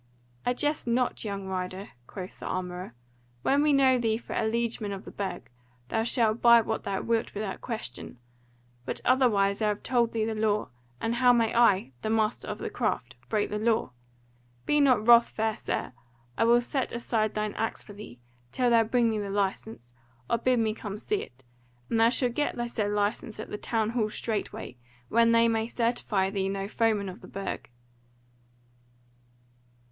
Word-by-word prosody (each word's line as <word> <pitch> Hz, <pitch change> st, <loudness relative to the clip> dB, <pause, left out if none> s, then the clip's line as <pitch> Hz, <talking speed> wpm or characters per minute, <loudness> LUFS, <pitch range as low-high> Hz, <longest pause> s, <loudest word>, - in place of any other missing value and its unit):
"I 245 Hz, -, +2 dB
jest 295 Hz, 0 st, -1 dB
not, 245 Hz, +1 st, 0 dB
young 200 Hz, -2 st, -4 dB
rider," 185 Hz, +1 st, -4 dB, 0.2 s
quoth 185 Hz, -2 st, -8 dB
the -, -, -6 dB
armourer. 180 Hz, -6 st, -4 dB, 0.5 s
"When 280 Hz, +1 st, +3 dB
we 300 Hz, 0 st, +3 dB
know 265 Hz, -2 st, +4 dB
thee 225 Hz, -2 st, +1 dB
for 235 Hz, -, -8 dB
a 220 Hz, -, 0 dB
liegeman 225 Hz, -2 st, -1 dB
of 195 Hz, 0 st, -6 dB
the -, -, -9 dB
Burg, 195 Hz, -11 st, -5 dB, 0.4 s
thou 225 Hz, -, +1 dB
shalt 225 Hz, -1 st, +1 dB
buy 235 Hz, -1 st, +8 dB
what 220 Hz, 0 st, -3 dB
thou 195 Hz, -1 st, -1 dB
wilt 230 Hz, -2 st, -1 dB
without 200 Hz, -2 st, -4 dB
question; 215 Hz, -, -6 dB, 0.7 s
but -, -, -4 dB
otherwise 220 Hz, -6 st, +3 dB
I 215 Hz, -, +2 dB
have 210 Hz, -1 st, -2 dB
told 235 Hz, -2 st, +2 dB
thee 220 Hz, -1 st, 0 dB
the 225 Hz, -, -2 dB
law, 215 Hz, -1 st, 0 dB, 0.3 s
and 225 Hz, -, -1 dB
how 245 Hz, +1 st, +5 dB
may 230 Hz, -2 st, +2 dB
I, 205 Hz, -, +4 dB
the -, -, -2 dB
master 220 Hz, 0 st, 0 dB
of 210 Hz, -, -4 dB
the -, -, -5 dB
craft, 130 Hz, -, -2 dB
break 215 Hz, -2 st, 0 dB
the 210 Hz, -, -1 dB
law? 220 Hz, -, +1 dB, 0.7 s
Be 295 Hz, -, +3 dB
not 255 Hz, -7 st, +4 dB
wrath, 235 Hz, 0 st, +8 dB
fair 220 Hz, 0 st, -1 dB
sir, 175 Hz, -, -3 dB, 0.4 s
I -, -, +2 dB
will 240 Hz, +1 st, +5 dB
set 265 Hz, +2 st, -2 dB
aside 225 Hz, -2 st, -1 dB
thine 210 Hz, -1 st, -1 dB
axe 225 Hz, -, -3 dB
for 205 Hz, -, -12 dB
thee, 205 Hz, -, -11 dB, 0.3 s
till 250 Hz, -1 st, +2 dB
thou 230 Hz, -1 st, +6 dB
bring 230 Hz, +1 st, +2 dB
me 215 Hz, -, -1 dB
the 200 Hz, -1 st, -4 dB
license, 195 Hz, -, -3 dB, 0.3 s
or 230 Hz, -, +1 dB
bid 255 Hz, +1 st, +2 dB
me 220 Hz, -2 st, +1 dB
come 210 Hz, -2 st, -6 dB
see 410 Hz, -, -1 dB
it, 125 Hz, +2 st, -12 dB, 0.5 s
and 225 Hz, -, +2 dB
thou 225 Hz, +1 st, +6 dB
shalt 245 Hz, -1 st, 0 dB
get 295 Hz, +4 st, -1 dB
the 240 Hz, 0 st, -2 dB
said 215 Hz, -3 st, -1 dB
license 210 Hz, +1 st, -1 dB
at 220 Hz, -, -7 dB
the 210 Hz, -, -3 dB
Town 225 Hz, -1 st, 0 dB
Hall 230 Hz, -3 st, 0 dB
straight 215 Hz, -1 st, -3 dB
way, 125 Hz, -, -8 dB, 0.3 s
when 230 Hz, +1 st, +4 dB
they 230 Hz, 0 st, +5 dB
may 225 Hz, -1 st, 0 dB
certify 230 Hz, -5 st, 0 dB
thee 195 Hz, -1 st, -1 dB
no 195 Hz, 0 st, -3 dB
foeman 215 Hz, -2 st, +1 dB
of 185 Hz, +4 st, -8 dB
the -, -, -11 dB
Burg." 195 Hz, -7 st, -5 dB
220 Hz, 190 wpm, -28 LUFS, 205-235 Hz, 0.7 s, buy